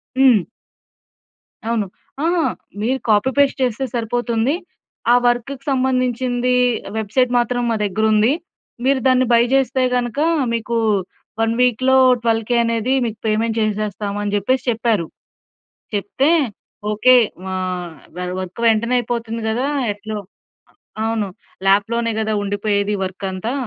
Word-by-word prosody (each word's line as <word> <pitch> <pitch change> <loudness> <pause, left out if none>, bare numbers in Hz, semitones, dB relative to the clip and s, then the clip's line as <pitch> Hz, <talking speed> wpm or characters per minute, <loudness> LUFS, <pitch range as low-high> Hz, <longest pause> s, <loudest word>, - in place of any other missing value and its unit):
హ్మ్. 255 -8 +4 1.2
అవును. 225 -2 0 0.4
ఆహా! 340 0 +2 0.4
మీరు 260 +4 0
కాపీ, 210 +4 +4
పేస్ట్ 280 -1 +3
చేస్తే 255 +2 -1
సరిపోతుంది. 240 +3 0 0.6
ఆ - - +6
వర్క్‌కు 245 +3 -1
సంబంధించిందీ, 255 -1 +1 0.4
వెబ్‌సైట్ 230 +4 +1
మాత్రం 245 +1 0
మా 230 - +1
దగ్గరుంది. 215 +4 +2 0.5
మీరు 270 0 +3
దాన్ని 255 0 +4
బయ్ 235 +1 +5
జేస్తే 265 -1 +2
గనక, 245 +2 -1 0.3
మీకు 230 +1 -2 0.7
1 225 0 +2
వీక్‌లో 255 +2 +3 0.3
12,000 225 +1 +1
అనేది 230 +2 0
మీకు 220 -1 -4
పేమెంట్ 220 +1 0
చేసేస్తాము 210 -1 -2
అని 205 - -2
చెప్పేసి 250 +6 +1
చెప్పారు. 225 -6 0 0.9
చెప్తే, 210 +9 +1 0.6
ఓకే. 255 +4 +5 0.4
ఆహ్, 180 -2 -3 0.2
వ - - -7 0.2
వర్క్ 185 +4 -7
వెంటనే 230 +2 +2
అయిపోతుంది 230 -1 -3
గదా! 250 +6 0 0.2
ఎట్లో 210 +1 -6 0.9
అవును. 225 -2 -1 0.4
ల్యాప్‌లోనే 230 +4 +2
గదా! 220 0 -1
ఉండిపోయేది 205 0 0
వర్కంతా. 190 +5 -4
230 Hz, 115 wpm, -19 LUFS, 210-250 Hz, 1.2 s, ఆ